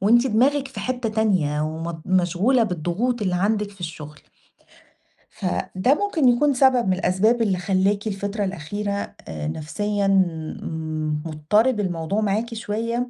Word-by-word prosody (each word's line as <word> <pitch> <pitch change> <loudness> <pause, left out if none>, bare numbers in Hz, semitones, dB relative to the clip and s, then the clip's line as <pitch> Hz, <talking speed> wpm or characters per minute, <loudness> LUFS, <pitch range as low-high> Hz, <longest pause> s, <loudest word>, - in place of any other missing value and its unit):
وأنتِ 235 +6 +4
دماغِك 270 +4 +2
في 265 - -7
حتة 250 -2 -2
تانية 190 -9 +1
ومض 160 +2 -4
مشغولة 185 +7 +2
بالضغوط 205 +6 -1
اللي 185 -3 0
عندِك 205 +3 0
في 195 -2 -19
الشغل. 150 -3 -7 1.1
فده 185 - 0
ممكن 340 -7 +1
يكون 275 +4 +4
سبب 255 -4 +4
من 185 - +3
الأسباب 190 +6 +2
اللي 200 -5 +1
خلّاكِ 195 +3 +1
الفترة 200 +1 -2
الأخيرة 195 +3 -3 0.4
آآ، 75 -2 -5
نفسيًا 200 - -2 1.2
مضطرب 210 - +1
الموضوع 180 +1 -1
معاكِ 215 +3 -1
شويّة 230 +3 -2
205 Hz, 130 wpm, -23 LUFS, 180-235 Hz, 1.2 s, وأنتِ